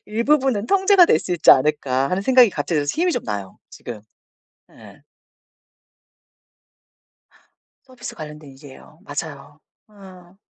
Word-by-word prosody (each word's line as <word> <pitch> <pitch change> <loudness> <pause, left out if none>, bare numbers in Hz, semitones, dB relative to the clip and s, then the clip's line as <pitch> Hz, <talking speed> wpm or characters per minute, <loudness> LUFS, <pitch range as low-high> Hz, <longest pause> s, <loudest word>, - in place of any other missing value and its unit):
'일부분은 235 0 0
통제가 385 - +4
될 155 - +3
수 180 - -5
있지 175 - +4
않을까.' 135 -1 +2
하는 185 +2 -2
생각이 250 0 +5
갑자기 170 -3 -3
들어서 145 -1 -1
힘이 360 0 +1
좀 - - -3
나요 100 -3 -6
지금. 115 -3 -10 0.7
예. - - -17 2.8
서비스 255 -2 -10
관련된 150 -2 -11
일이에요. 140 +3 -16
맞아요. 145 0 -8 0.3
어. 190 -3 -17
175 Hz, 270 characters per minute, -20 LUFS, 145-240 Hz, 2.8 s, 생각이